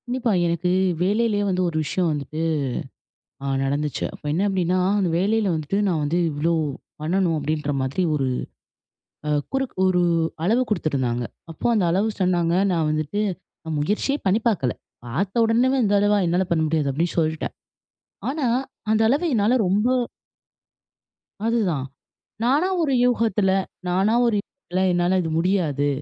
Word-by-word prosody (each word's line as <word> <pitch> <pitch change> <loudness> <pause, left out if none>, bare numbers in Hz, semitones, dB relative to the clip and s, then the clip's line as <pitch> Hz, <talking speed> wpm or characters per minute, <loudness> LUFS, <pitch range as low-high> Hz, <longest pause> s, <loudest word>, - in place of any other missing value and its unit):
கண்டிப்பா. 245 -2 0
எனக்கு 170 +1 0 0.3
வேலைலே 210 +3 +2
வந்து 185 -1 0
ஒரு 160 - -4
விஷயம் 180 +5 0
வந்துட்டு, 150 +1 -4 1.0
அ - - -2 0.2
நடந்துச்சு. 145 +2 -1
அப்ப - - -14
என்ன 170 +5 +1
அப்டின்னா, 185 -2 +1 0.2
அந்த 190 -3 +1
வேலைல 210 +3 +1
வந்துட்டு, 160 +5 -2
நான் 165 -4 0
வந்து 160 +4 0
இவ்ளோ, 155 +4 0 0.5
பண்ணணும் 170 +1 +1
அப்டின்ற 150 0 -2
மாதிரி 130 +8 -1
ஒரு 135 -3 0 1.0
அ - - 0 0.2
குறுக் 270 -1 -1
ஒரு 180 -1 +3 0.4
அளவு 225 +8 +3
குடுத்துருந்தாங்க. 130 - 0 0.3
அப்போ 160 - -9
அந்த 210 -4 +2
அளவு 200 +5 +1
சொன்னாங்க, 175 -2 +2 0.2
நான் 165 -3 +1
வந்துட்டு, 155 +7 -1 0.5
அ - - -3
முயற்சியே 210 - 0
பண்ணி 195 +3 +3
பார்க்கல. 140 - 0 0.3
பார்த்த 190 - -1
உடனேவே, 245 +4 +2
"இந்த 205 -1 +2
அளவா? 205 +1 +3
என்னால 180 +3 +1
பண்ண 165 -2 +2
முடியாது" 155 -2 0
அப்டி 160 +6 0
சொல்ட்டேன். 160 -1 0 0.8
ஆனா, 285 0 -1 0.4
அந்த 220 0 +3
அளவு 280 +9 +2
என்னால 215 +1 +3
ரொம்ப 205 +5 +2 1.6
அதுதான். 195 - 0 0.6
நானா 280 +9 +3
ஒரு 290 -4 +1
யூகத்தில 225 -5 +2 0.4
நானா 190 +5 +2
ஒரு 230 -2 +2
யூகத்தில 190 -7 -5
என்னால 175 +1 +2
இது 165 - -3
முடியாது. 165 -6 +1
185 Hz, 140 wpm, -23 LUFS, 155-215 Hz, 1.6 s, ஒரு